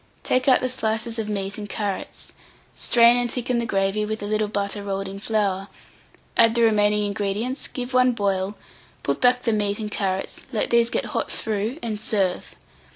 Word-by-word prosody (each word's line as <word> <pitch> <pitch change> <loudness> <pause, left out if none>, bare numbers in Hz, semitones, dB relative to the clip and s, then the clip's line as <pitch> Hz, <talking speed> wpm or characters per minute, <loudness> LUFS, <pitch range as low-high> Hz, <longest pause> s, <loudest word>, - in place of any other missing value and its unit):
Take 255 +1 +1
out 260 - +6
the 255 - +1
slices 225 -2 -2
of 215 -1 -3
meat 200 0 -3
and 205 -1 -6
carrots, 200 -1 -4 0.4
strain 235 0 +5
and 245 -1 0
thicken 250 -1 -1
the 235 - -2
gravy 195 +1 +1
with 215 0 -3
a - - -2
little 215 0 0
butter 205 0 -2
rolled 195 -1 -3
in 195 +1 -7
flour; 200 -3 0 0.7
add 230 0 +5
the 235 - +4
remaining 210 -1 +3
ingredients, 205 +5 -2
give 250 0 -6
one 255 0 +4
boil, 200 -2 -1 0.5
put 140 - -1
back 250 0 +4
the 230 - +1
meat 205 -1 0
and 215 -1 -4
carrots, 190 -2 -2
let 220 - -1
these 235 0 +4
get - - -1
hot - - -1
through, 220 +4 -2
and 215 -3 -3
serve. 195 -4 -1
215 Hz, 185 wpm, -24 LUFS, 200-235 Hz, 0.7 s, out